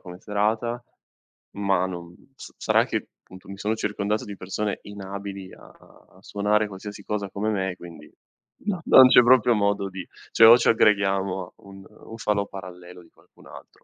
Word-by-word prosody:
come 90 0 -11
serata, 110 +4 -2 0.8
ma 95 -2 +1
non 85 -1 -9 0.2
sa - - -12
sarà - - +2
che, - - -4 0.2
appunto, 95 +1 -15
mi 100 - -8
sono 105 +3 -2
circondato 105 0 -2
di 100 -1 -9
persone 100 +2 -4
inabili 100 -1 -8
a - - -16 0.5
suonare 105 +2 0
qualsiasi 100 +1 -10
cosa 100 -2 -4
come 105 +2 -2
me, 95 -3 -2
quindi 85 -4 -13 0.5
non 200 -4 -2
non 130 -1 +8
c'è 125 - +7
proprio 120 -1 +4
modo 100 -1 0
di 95 0 -9 0.2
cioè 115 - +6
o 115 +2 +9
ci - - 0
aggreghiamo 100 -3 +2
a - - -19
un 95 -1 -13
un 110 +1 -13
falò 105 -2 -1
parallelo 90 -2 -11
di 85 - -21
qualcun - - -22
altro - - -15
100 Hz, 170 wpm, -24 LUFS, 95-105 Hz, 0.8 s, o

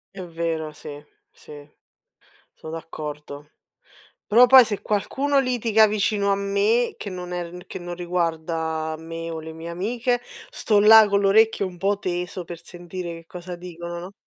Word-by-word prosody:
È 190 - -7
vero, 165 -2 -3
sì, 145 -1 -9 0.3
sì. 145 -1 -13 0.9
Sono 160 - -10
d'accordo. 150 -2 -8 0.8
Però 240 +4 +7
poi 260 -1 +9
se 205 -2 -4
qualcuno 275 +7 0
litiga 230 -4 +3
vicino 205 -1 0
a - - +1
me, 200 +4 +1
che 205 - -6
non 180 -1 -7
è 175 -1 -4
r 180 +1 -11
che - - -7
non 175 0 -6
riguarda 160 -2 -2
me 165 +1 -7
o 160 -1 -5
le 160 0 -8
mie 160 +1 -8
amiche, 235 +8 -1 0.3
sto 210 -2 +2
là 220 +1 +8
con 200 0 +2
l'orecchio 205 0 +3
un 180 - -8
po' 200 +2 0
teso 180 -1 -4
per 170 0 -9
sentire 175 0 -7
che 165 0 -11
cosa 180 +1 -8
dicono, 175 -1 -7
no? 180 +3 -8
180 Hz, 165 wpm, -23 LUFS, 165-205 Hz, 0.9 s, poi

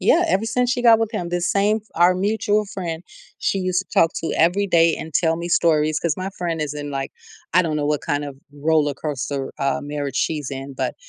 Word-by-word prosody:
Yeah, 355 - +4
ever 200 -3 +1
since 245 +2 0
she 250 - 0
got 230 -2 +6
with 225 -1 0
him, 185 -7 -3
the 175 0 -1
same 200 +5 +1 0.2
our 175 +2 +5
mutual 210 +2 +1
friend, 175 -4 -5 0.4
she 195 - 0
used 185 0 0
to - - -48
talk 165 - +3
to 165 - -3
every 180 +5 +3
day 165 -2 +4
and 160 - -8
tell 165 +1 +2
me 170 +1 -5
stories- 155 -3 +2
'cause 170 -2 0
my 185 +1 -4
friend 170 -2 -2
is 150 -2 -3
in, 145 -1 -5
like, 135 0 -3 0.4
I 180 +3 +5
don't 160 -3 -1
know 145 -1 -1
what 150 -1 0
kind 145 0 -2
of 140 -2 -8 0.2
roller 145 0 +1
coaster, 140 -2 -4
uh, 140 0 0
marriage 145 -2 -4
she's 150 -4 -1
in- 135 +1 -6
but - - -2
165 Hz, 225 wpm, -22 LUFS, 150-190 Hz, 0.4 s, got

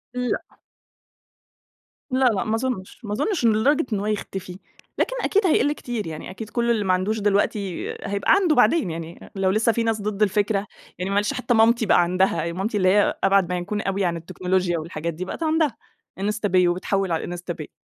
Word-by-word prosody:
لأ. 250 -1 -3 1.5
لأ، 260 +1 +2
لأ 220 -6 +2
ما 220 - 0
أظنش، 225 -5 -3
ما 210 -2 -4
أظنش 335 - 0
إن 225 - +5
لدرجة 275 +8 +2
أن 205 - 0
هو 200 - -3
يختفي، 195 -3 -4 0.4
لكن - - 0
أكيد 410 0 +2
هيقل 290 -3 +3
كتير، 240 - -5
يعني 155 -1 -7
أكيد 215 +4 -8
كل 235 0 0
اللي 220 -3 +1
ما 185 - +3
عندوش 195 +4 0
دلوقتي 200 -2 0
هيبقى 200 0 0
عنده 365 -6 +3
بعدين، 245 - +3
يعني 165 +1 -8
لو 195 -1 +1
لسّه 220 +3 +3
في 230 +1 -1
ناس 225 -2 0
ضد 210 0 -3
الفكرة، 205 0 +1 0.3
يعني 185 +2 -2
معلش 205 +5 +1
حتّى 250 -2 0
مامتي 230 +1 +4
بقى 190 - +5
عندها، 180 -1 +1
مامتي 200 +5 -2
اللي 185 -2 +3
هي 205 +2 +3
أبعد 195 -2 +3
ما 180 - -1
يكون 205 +4 -3
أوي 195 -1 -2
يعني 175 -3 +1
عن 165 - -6
التكنولوجيا 180 0 -1
والحاجات 165 +1 -4
دي، 180 +4 -5
بقت 260 - -5
عندها، 310 -6 +1 0.4
إنستا 210 +2 -1
باي 180 -2 +4
وبتحول 185 +1 0
على 165 - 0
الإنستا 175 0 -5
باي. 155 -2 -8
205 Hz, 200 wpm, -23 LUFS, 185-230 Hz, 1.5 s, إن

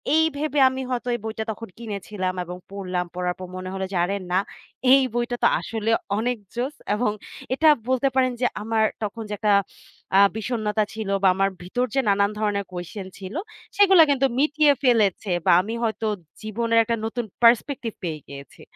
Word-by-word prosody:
এই 320 - +5
ভেবে 295 -1 -1
আমি 260 0 -4
হয়তো 245 0 -2
এই - - -5
বইটা 220 0 -3
তখন 225 -1 -8
কিনেছিলাম 200 -4 -4
এবং 180 +1 -7
পড়লাম। 185 -3 -3
পড়ার 180 0 -1
পর 185 - -6
মনে 185 0 -5
হলো 190 0 -2
যে, - - -4
"আরে 195 +3 0 0.2
না 185 - +3 0.5
এই 270 0 +8
বইটা 240 0 -1
তো - - +7
আসলে 225 -1 -3 0.3
অনেক 245 +2 0 0.2
জোস" 260 +5 -2 0.2
এবং 210 0 +1 0.4
এটা 315 +4 +3 0.2
বলতে 260 +1 +2
পারেন 255 -1 +3
যে - - +3 0.2
আমার 220 0 +1 0.2
তখন 220 +2 -4
যে - - -3
একটা 210 -2 +1 0.7
আ - - +7 0.2
বিষন্নতা 215 -1 -1
ছিল 220 -2 -5
বা - - +6
আমার 195 0 +2
ভিতর 245 +8 -1
যে - - +3
নানান 200 +1 +3
ধরণের 205 -2 -1
কোয়েশ্চেন 180 +2 -6
ছিল 190 +6 -8 0.4
সেগুলা 385 -4 +7
কিন্তু 275 -1 +3
মিটিয়ে 300 0 +4
ফেলেছে 215 -5 +2 0.2
বা 180 - +5
আমি 220 +5 -5
হয়তো 220 0 -1 0.4
জীবনের 230 +1 +1
একটা 230 +1 -1
নতুন 235 +1 -3 0.2
পার্সপেক্টিভ 235 0 +3
পেয়ে 155 -2 -3
গিয়েছি। 140 0 -11
220 Hz, 180 wpm, -24 LUFS, 195-245 Hz, 0.7 s, এই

